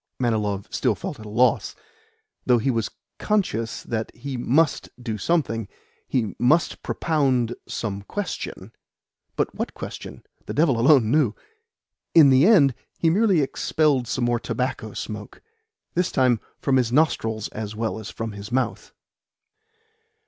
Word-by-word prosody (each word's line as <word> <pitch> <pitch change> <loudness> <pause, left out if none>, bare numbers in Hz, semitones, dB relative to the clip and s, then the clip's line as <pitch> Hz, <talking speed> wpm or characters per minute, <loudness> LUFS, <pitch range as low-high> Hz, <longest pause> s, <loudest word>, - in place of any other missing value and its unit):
Manilov 105 -5 0
still 125 -5 +1
felt 165 - -6
at 110 - -9
a - - -8
loss 120 +4 +2 0.7
though 125 -1 +4
he 130 +4 +1
was 115 -3 -1 0.3
conscious 145 - -1
that 110 -1 -3
he 140 -1 -6
MUST 140 +6 +1
do 115 -4 -4
something, 115 - 0 0.4
he 115 -6 -1
MUST 155 +8 +2
propound 130 -7 +1
some 100 -3 -4
question. 115 - -5 0.6
But - - -1
what - - -4
question? - - -8 0.2
The - - -4
devil 145 -6 +3
alone 125 -3 +5
knew! 135 -8 +3 0.8
In 150 -5 +8
the 130 +6 +6
end 150 - +6 0.2
he 165 - +3
merely 195 -3 +3
expelled 140 -2 +1
some 120 +1 -1
more 120 0 +1
tobacco 125 -4 -3
smoke 105 -1 -7 0.5
this 180 +1 0
time 125 -3 +3 0.2
from 135 -2 +1
his 120 -3 +1
nostrils 115 -7 +1
as 105 -1 -6
well 110 0 -2
as 110 - -7
from 115 -1 -5
his 100 +2 -9
mouth. 130 +1 -2
125 Hz, 140 wpm, -24 LUFS, 110-150 Hz, 0.8 s, In